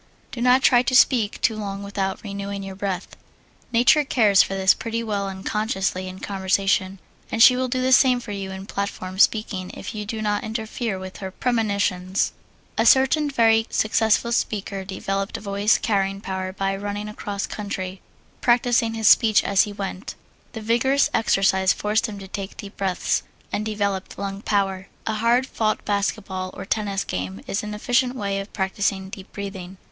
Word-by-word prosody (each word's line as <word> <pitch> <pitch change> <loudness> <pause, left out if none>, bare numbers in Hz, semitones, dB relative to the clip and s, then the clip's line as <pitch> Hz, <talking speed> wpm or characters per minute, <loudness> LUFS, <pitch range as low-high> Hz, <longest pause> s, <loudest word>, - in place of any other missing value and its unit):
Do 235 - -6
not 250 +2 +4
try 245 -2 +6
to 255 +1 0
speak 235 -5 +4
too 225 - +2
long 200 -2 -5
without 195 -1 -3
renewing 200 -1 -5
your 195 0 -6
breath. 190 -1 -3 0.6
Nature 245 +6 +5
cares 215 -8 +4
for 195 - -1
this 190 0 +5
pretty 230 -1 -4
well 205 -3 -2
unconsciously 190 -1 -2
in 185 0 -8
conversation, 195 0 0 0.3
and 225 - +4
she 250 - +8
will 255 0 0
do 255 0 -1
the 260 - +1
same 255 -1 +5
for 235 -3 -8
you 195 -1 -4
in 190 0 -7
platform 195 -2 -4
speaking 200 -4 +2
if - - -7
you 210 -1 -5
do 225 +1 -4
not 210 -1 -1
interfere 220 -1 -3
with 185 0 -8
her 190 -2 -5
premonitions. 200 -4 0 0.5
A - - +3
certain 280 +3 +4
very 225 -4 +3
successful 220 +1 +2
speaker 200 -4 -2
developed 195 +1 -3
voice 200 +1 +1
carrying 195 -3 0
power 190 -1 -4
by 195 0 -2
running 205 +1 -4
across 205 -1 -4
country, 190 -2 -5 0.4
practising 240 -1 +2
his 220 -2 +1
speeches 220 -1 +6
as 200 -1 +4
he 210 - -7
went. 195 -1 -6 0.4
The 225 - -6
vigorous 240 +6 +2
exercise 190 -3 +3
forced 210 +1 0
him 210 -2 -7
to 195 -1 -9
take 195 +1 -6
deep 200 0 -9
breaths, 190 -2 0 0.3
and 210 - -1
developed 200 -3 -2
lung 200 0 -4
power. 195 -2 -1 0.2
A 220 - -1
hard 235 +4 +2
fought 215 -4 -1
basketball 200 -2 -2
or - - -7
tennis 200 -1 -1
game 95 +1 -5
is 195 - -2
an 210 0 -5
efficient 245 +3 +1
way 200 -4 -2
of 195 +1 -7
practising 190 0 -1
deep 190 -1 -10
breathing. 195 -2 -7
200 Hz, 170 wpm, -23 LUFS, 195-225 Hz, 0.6 s, she